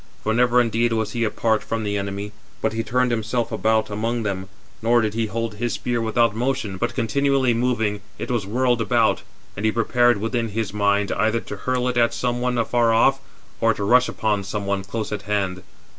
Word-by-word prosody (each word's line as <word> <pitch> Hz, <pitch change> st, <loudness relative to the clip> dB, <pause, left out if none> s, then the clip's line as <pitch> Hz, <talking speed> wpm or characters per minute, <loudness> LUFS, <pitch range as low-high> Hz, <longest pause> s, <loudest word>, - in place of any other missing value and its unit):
For 110 Hz, -, +1 dB
never 125 Hz, +1 st, +4 dB
indeed 115 Hz, 0 st, +2 dB
was 110 Hz, -1 st, -1 dB
he 115 Hz, 0 st, -1 dB
apart 110 Hz, 0 st, +1 dB
from 115 Hz, -1 st, -3 dB
the 105 Hz, -1 st, -1 dB
enemy, 100 Hz, +1 st, -3 dB, 0.3 s
but 110 Hz, -, -1 dB
he 115 Hz, -, -1 dB
turned 125 Hz, +2 st, +1 dB
himself 115 Hz, +1 st, -1 dB
about 110 Hz, -1 st, +1 dB
among 115 Hz, +3 st, -1 dB
them: 95 Hz, -2 st, -3 dB, 0.3 s
nor 120 Hz, +2 st, +4 dB
did 110 Hz, -2 st, 0 dB
he 115 Hz, 0 st, -1 dB
hold 115 Hz, 0 st, -3 dB
his 120 Hz, +2 st, -2 dB
spear 120 Hz, -1 st, -1 dB
without 115 Hz, -1 st, +2 dB
motion, 120 Hz, -5 st, -1 dB
but -, -, -2 dB
continually 135 Hz, +1 st, +2 dB
moving, 115 Hz, -4 st, 0 dB, 0.2 s
it -, -, -4 dB
was 115 Hz, -5 st, -1 dB
whirled 120 Hz, +2 st, +1 dB
about; 110 Hz, -, +2 dB, 0.3 s
and 100 Hz, -, -6 dB
he 110 Hz, -, +3 dB
prepared 120 Hz, +1 st, +3 dB
within 115 Hz, +2 st, -1 dB
his 110 Hz, -2 st, -3 dB
mind, 100 Hz, -1 st, +1 dB
either 110 Hz, +1 st, +1 dB
to 105 Hz, -, -7 dB
hurl 125 Hz, +4 st, -1 dB
it 125 Hz, -1 st, -1 dB
at 115 Hz, 0 st, +3 dB
some 120 Hz, +1 st, -1 dB
one 125 Hz, 0 st, 0 dB
afar 115 Hz, 0 st, +2 dB
off, 135 Hz, +4 st, +4 dB, 0.4 s
or 115 Hz, 0 st, +3 dB
to 100 Hz, -, -4 dB
rush 125 Hz, +5 st, +4 dB
upon 105 Hz, -2 st, -1 dB
some 100 Hz, +1 st, -4 dB
one 100 Hz, -1 st, -1 dB
close 110 Hz, +3 st, -4 dB
at 105 Hz, -2 st, -3 dB
hand. 95 Hz, -3 st, -1 dB
115 Hz, 205 wpm, -22 LUFS, 105-120 Hz, 0.4 s, never